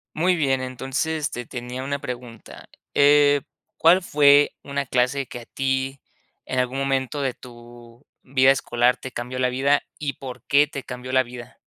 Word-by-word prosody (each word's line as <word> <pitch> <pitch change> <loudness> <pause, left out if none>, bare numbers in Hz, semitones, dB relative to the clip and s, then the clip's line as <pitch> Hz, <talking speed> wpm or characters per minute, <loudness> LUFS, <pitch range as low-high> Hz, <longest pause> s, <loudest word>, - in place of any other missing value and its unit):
Muy 180 +3 +2
bien, 135 -5 +1
entonces, 135 +5 -2
te 125 -1 -6
tenía 125 +2 -6
una 140 +1 -2
pregunta, 120 -3 -9 0.2
eh, 145 0 +5 0.4
¿cuál 175 +4 +5
fue 145 -3 +5
una 140 0 -3
clase 130 +2 0
que 120 - -8
a 115 - -13
ti 135 0 -2 0.4
en 130 - -3
algún 125 +1 0
momento 135 +1 -1
de 135 -2 0
tu 120 0 -15 0.2
vida 130 0 +4
escolar 125 -2 +2
te 130 - -8
cambió 125 +1 -5
la 125 0 +2
vida 140 +3 +2 0.2
y 145 -3 -3
por 130 -2 -8
qué 145 +1 +4
te 140 -2 -7
cambió 125 0 -7
la 130 0 +4
vida? 125 0 -11
130 Hz, 170 wpm, -23 LUFS, 125-140 Hz, 0.4 s, eh